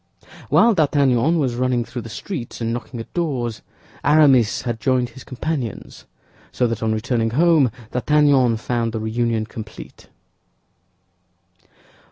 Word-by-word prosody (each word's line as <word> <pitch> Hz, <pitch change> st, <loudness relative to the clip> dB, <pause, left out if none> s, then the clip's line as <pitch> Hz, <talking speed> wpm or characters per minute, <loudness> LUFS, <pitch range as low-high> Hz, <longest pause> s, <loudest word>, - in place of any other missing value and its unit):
While 230 Hz, 0 st, +5 dB
D'Artagnan 145 Hz, -, +2 dB
was 135 Hz, -6 st, 0 dB
running 125 Hz, -1 st, 0 dB
through 120 Hz, +1 st, -6 dB
the 115 Hz, -, -9 dB
streets 120 Hz, -, -6 dB
and 115 Hz, -1 st, -2 dB
knocking 120 Hz, 0 st, -6 dB
at 115 Hz, -, -9 dB
doors, 125 Hz, -10 st, -2 dB, 0.4 s
Aramis 140 Hz, -7 st, +4 dB
had 120 Hz, -3 st, -3 dB
joined 125 Hz, 0 st, +1 dB
his 125 Hz, +2 st, -13 dB
companions; 130 Hz, -3 st, -5 dB, 0.5 s
so 125 Hz, -, 0 dB
that 115 Hz, -2 st, -2 dB
on 110 Hz, -1 st, 0 dB
returning 115 Hz, +1 st, 0 dB
home 150 Hz, 0 st, +3 dB, 0.2 s
D'Artagnan 135 Hz, -3 st, +3 dB
found 115 Hz, 0 st, -2 dB
the 110 Hz, -, -2 dB
reunion 110 Hz, 0 st, -1 dB
complete. 110 Hz, -1 st, -10 dB
120 Hz, 130 wpm, -21 LUFS, 115-140 Hz, 0.5 s, While